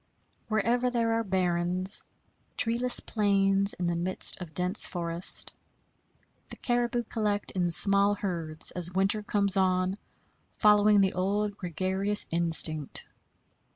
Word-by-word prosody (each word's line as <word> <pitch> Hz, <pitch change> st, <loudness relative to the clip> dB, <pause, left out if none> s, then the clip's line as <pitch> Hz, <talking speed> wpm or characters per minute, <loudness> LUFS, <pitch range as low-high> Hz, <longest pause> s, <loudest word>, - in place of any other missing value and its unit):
Wherever 235 Hz, +3 st, 0 dB
there 230 Hz, -2 st, -1 dB
are 225 Hz, 0 st, -1 dB
barrens 185 Hz, 0 st, -1 dB, 0.5 s
treeless 240 Hz, +2 st, +2 dB
plains 200 Hz, -2 st, +1 dB
in 180 Hz, -, -5 dB
the 170 Hz, 0 st, -1 dB
midst 180 Hz, +2 st, 0 dB
of 160 Hz, -4 st, -10 dB
dense 180 Hz, +3 st, +2 dB
forest 170 Hz, 0 st, +2 dB, 1.0 s
the -, -, -9 dB
caribou 240 Hz, -1 st, -2 dB
collect 210 Hz, -3 st, -3 dB
in 180 Hz, -2 st, -1 dB
small 200 Hz, +4 st, +3 dB
herds 170 Hz, -6 st, -3 dB
as 175 Hz, -1 st, -2 dB
winter 195 Hz, +3 st, +1 dB
comes 205 Hz, -1 st, 0 dB
on, 185 Hz, +1 st, 0 dB, 0.6 s
following 210 Hz, -1 st, +4 dB
the 190 Hz, -1 st, +1 dB
old 200 Hz, +2 st, -2 dB
gregarious 190 Hz, +3 st, -1 dB
instinct. 160 Hz, -3 st, +1 dB
195 Hz, 120 wpm, -27 LUFS, 180-210 Hz, 1.0 s, following